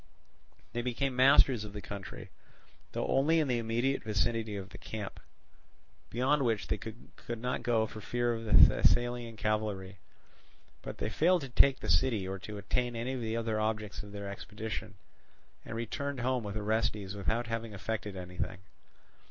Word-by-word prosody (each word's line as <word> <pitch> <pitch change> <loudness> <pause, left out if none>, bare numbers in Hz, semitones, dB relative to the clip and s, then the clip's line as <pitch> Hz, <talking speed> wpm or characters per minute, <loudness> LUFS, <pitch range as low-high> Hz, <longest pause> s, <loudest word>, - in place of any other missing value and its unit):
They 120 - -1
became 125 +2 -1
masters 130 -2 +6
of 105 -1 -8
the 105 - -5
country, 100 -2 -8 0.6
though - - -1
only 155 +5 +3
in 155 - +2
the 125 -2 +1
immediate 120 +4 0
vicinity 110 0 0
of 95 -1 -6
the 95 - -11
camp; 105 0 -6 0.9
beyond 135 +4 +2
which 115 -4 +1
they - - -1
could 115 +1 -8
not 125 +2 -2
go 115 -2 +2
for 110 0 -8
fear 120 +3 0
of 115 0 -4
the 105 - 0
Thessalian 120 -2 +5
cavalry. 105 -3 -1 0.8
But - - -7
they - - -2
failed 175 +2 +4
to 135 - -6
take 130 +2 +5
the - - -4
city 95 +4 +2
or 95 0 -4
to 105 +2 -7
attain 120 +4 -1
any 120 +3 -2
of 130 - -3
the 115 0 -1
other 110 -2 0
objects 110 -2 -1
of 105 -1 -11
their 100 0 -6
expedition, 105 +2 -5 0.7
and - - -6
returned 130 +4 -3
home 125 0 +1
with 105 0 -4
Orestes 105 -2 0
without 110 +4 0
having 115 -1 -3
effected 105 0 -3
anything. 90 +1 -4
110 Hz, 170 wpm, -32 LUFS, 105-120 Hz, 0.9 s, masters